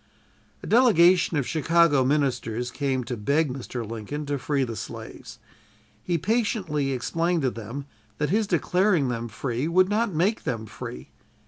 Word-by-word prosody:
A - - -6
delegation 180 -8 +5
of 140 - 0
Chicago 160 -2 +3
ministers 125 -4 0
came 135 -3 -1
to 125 +1 -4
beg 140 +6 +1
Mr. 125 -3 -6
Lincoln 115 +7 -5
to 145 -1 -2
free 140 +1 0
the 115 -3 -4
slaves. - - -8 0.6
He 170 +7 -1
patiently 185 - 0
explained 165 +6 0
to 130 - +1
them 115 +5 -7 0.3
that 150 +1 -1
his 215 +1 +2
declaring 180 -3 +2
them 120 -1 -3
free 120 +4 -3
would 185 +3 +3
not 215 +1 +1
make 185 +7 +1
them 115 -2 -3
free. 65 - -8
145 Hz, 150 wpm, -25 LUFS, 125-175 Hz, 0.6 s, delegation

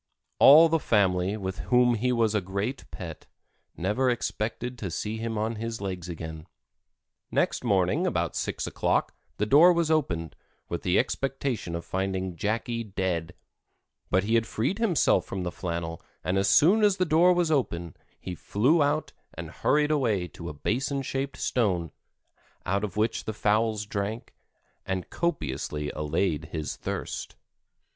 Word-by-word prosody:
All 155 +4 +9
the 165 0 +1
family, 95 -4 +2
with 95 -2 -5
whom 125 -1 +5
he 120 +3 0
was 115 -3 +2
a 105 - +1
great 100 +8 -4
pet, - - -8 0.5
never 105 +9 +1
expected 120 +1 -2
to 95 - -3
see 105 +6 -3
him 115 0 -3
on 110 +1 -1
his 115 +1 -4
legs 95 -3 -5
again. 80 -1 -7 0.8
Next - - 0
morning - - +2
about - - -1
six - - -2
o'clock - - 0 0.2
the 105 - +1
door 150 +10 +7
was 170 -2 +1
opened, 85 - 0 0.3
with 85 - -4
the 90 +1 +2
expectation 135 -9 -1
of 85 - -5
finding 95 -1 -2
Jackie 115 +5 -2
dead, 95 -5 -3 0.7
but 95 - +2
he 110 +3 -1
had 115 -1 +3
freed 135 - -1
himself 180 - +3
from 95 -1 -4
the 90 - -3
flannel 85 -2 -4 0.2
and 90 - 0
as 100 - +2
soon 200 +8 +5
as 205 -2 +4
the 185 - +2
door 170 +3 +5
was 175 -2 +2
open 85 - -1 0.2
he 90 - -6
flew 125 - +2
out 145 +2 0 0.2
and - - -7
hurried 150 0 +2
away 110 -11 +1
to - - -8
a - - -6
basin 130 - -1
shaped 135 +1 -3
stone, 90 -9 0 0.7
out 100 +2 0
of 105 -2 -4
which 110 +1 0
the 110 - -3
fowls 105 0 +1
drank, 105 +3 -4 0.5
and 95 -2 -4
copiously 75 - -2
allayed 75 +1 -1
his 80 -1 -4
thirst. - - -5
105 Hz, 155 wpm, -27 LUFS, 90-135 Hz, 0.8 s, All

